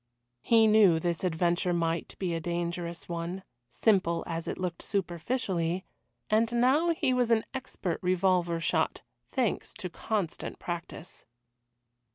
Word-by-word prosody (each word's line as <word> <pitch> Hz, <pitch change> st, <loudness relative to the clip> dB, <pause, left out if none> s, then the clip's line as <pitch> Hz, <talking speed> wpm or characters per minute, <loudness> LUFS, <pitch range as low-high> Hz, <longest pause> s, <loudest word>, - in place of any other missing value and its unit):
He 225 Hz, -, +5 dB
knew 210 Hz, -6 st, +6 dB
this 170 Hz, +1 st, -2 dB
adventure 175 Hz, +1 st, +1 dB
might 165 Hz, -1 st, -1 dB
be 180 Hz, -3 st, -1 dB
a 165 Hz, -, -1 dB
dangerous 170 Hz, 0 st, -3 dB
one, 170 Hz, +2 st, -4 dB, 0.3 s
simple 175 Hz, -, +2 dB
as 165 Hz, 0 st, -4 dB
it -, -, -3 dB
looked 180 Hz, -2 st, -3 dB
superficially, 180 Hz, -2 st, -1 dB, 0.4 s
and 225 Hz, +2 st, +2 dB
now 265 Hz, +8 st, +3 dB
he 315 Hz, -6 st, +2 dB
was 250 Hz, -2 st, +2 dB
an 225 Hz, -1 st, +3 dB
expert 255 Hz, -9 st, -3 dB
revolver 180 Hz, -2 st, +2 dB
shot, 165 Hz, -, 0 dB, 0.3 s
thanks 250 Hz, -5 st, -1 dB
to 180 Hz, -3 st, -5 dB
constant 205 Hz, -6 st, -3 dB
practice. 175 Hz, 0 st, -6 dB
180 Hz, 130 wpm, -29 LUFS, 170-220 Hz, 0.4 s, knew